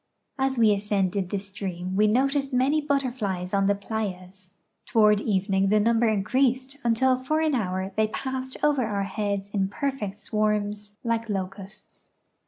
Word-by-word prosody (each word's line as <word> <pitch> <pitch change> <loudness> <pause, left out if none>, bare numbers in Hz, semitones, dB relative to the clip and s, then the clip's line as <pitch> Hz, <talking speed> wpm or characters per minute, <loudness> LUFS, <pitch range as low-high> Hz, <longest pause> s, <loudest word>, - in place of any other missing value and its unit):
As 265 -1 +1
we 220 -3 +5
ascended 200 -2 -1
the 205 - -1
stream 190 -2 -5
we 210 +2 +4
noticed 275 +5 +1
many 265 +4 +2
butterflies 245 -11 -2
on 195 0 +3
the 200 - +3
playas. 190 -3 -6 0.3
Toward 210 -2 +4
evening 195 -2 +1
the 215 - +4
numl^er 230 +1 +3
increased 260 +6 0
until 240 +3 +3
for 310 +5 0
an 315 -2 +1
hour 190 -5 -1
they 220 0 +2
passed 260 +3 -4
over 290 -3 +3
our 205 -3 -1
heads 200 0 -3
in 195 -2 0
perfect 210 -3 -3
swarms 210 -1 -1
like 230 -1 -1
locusts. 195 +1 -6
210 Hz, 150 wpm, -26 LUFS, 195-255 Hz, 0.3 s, we